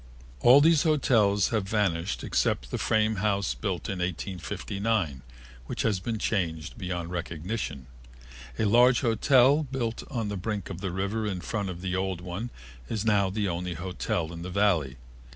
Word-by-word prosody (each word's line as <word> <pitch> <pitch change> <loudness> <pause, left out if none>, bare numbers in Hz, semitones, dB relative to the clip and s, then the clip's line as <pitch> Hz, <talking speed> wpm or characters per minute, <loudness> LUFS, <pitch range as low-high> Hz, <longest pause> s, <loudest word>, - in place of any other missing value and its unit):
All 130 - +7
these 160 -1 +5
hotels 115 - +3
have 105 -4 -1
vanished 100 -4 0
except - - 0
the - - -2
frame 110 0 +2
house 100 0 0
built 95 -6 -3
in 95 -3 -3
1859, 95 - -2 0.5
which - - -3
has 105 -4 +1
been 110 +4 -3
changed 85 -7 -2
beyond 90 -4 -4
recognition. 85 - -4 0.7
A - - +1
large 120 +4 +5
hotel 130 +4 +4
built 130 -5 -3
on 115 -7 -2
the 105 - -3
brink 100 0 -4
of 85 - -7
the 95 - -2
river 100 +4 -2
in 95 -3 -2
front 100 +1 -3
of 90 -1 -6
the 90 -1 -2
old 95 -1 -1
one 90 +7 -5 0.4
is 110 -1 -2
now 100 -3 +3
the 105 +1 -1
only 90 0 -3
hotel 85 -1 -3
in 85 - -7
the 90 - -5
Valley. 90 -9 +1
100 Hz, 165 wpm, -27 LUFS, 90-110 Hz, 0.7 s, All